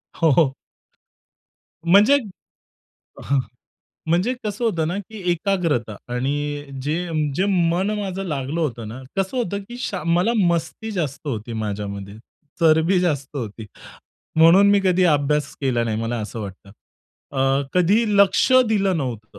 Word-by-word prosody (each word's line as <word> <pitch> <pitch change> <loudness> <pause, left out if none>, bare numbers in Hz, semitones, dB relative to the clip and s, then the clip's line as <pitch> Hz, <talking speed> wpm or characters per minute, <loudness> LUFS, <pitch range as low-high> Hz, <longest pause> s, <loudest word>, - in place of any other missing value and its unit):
हो, 165 -3 +3
हो. 135 -1 +3 1.3
म्हणजे 205 +10 +6 1.1
हं. 140 -1 +1 0.7
म्हणजे 180 +9 +2
कसं 210 +3 -3
होतं 170 -8 0
ना 180 - -2
की 205 +1 -9
एकाग्रता 165 - 0 0.2
आणि 145 +3 -2 0.2
जे 150 +3 -1 0.4
जे 185 +5 +1
मन 180 +1 +1
माझं 195 -1 -3
लागलं 150 0 -3
होतं 120 -8 -3
ना 120 +4 -8 0.2
कसं 195 +6 -1
होतं 200 -5 -1
की 240 - -8
शा 195 -9 -3
मला 175 +7 +2
मस्ती 175 +5 -1
जास्त 155 -7 -4
होती 115 -2 -4
माझ्यामध्ये, 100 -2 -5 0.5
चरबी 160 +3 +4
जास्त 145 -5 -2
होती. 110 -3 -6 0.7
म्हणून 180 +5 +7
मी 200 -1 +4
कधीही 185 -1 +3
अभ्यास 150 0 +1
केला 125 -4 +1
नाही 110 -2 -2
मला 115 +1 -2
असं 110 +2 -6
वाटतं. 100 -1 -9 0.6
अ, 135 0 +1
कधी 190 +6 +3
लक्ष 200 +6 +4 0.2
दिलं 195 -4 +1
नव्हतं 110 -7 -5
160 Hz, 135 wpm, -22 LUFS, 130-190 Hz, 1.3 s, म्हणून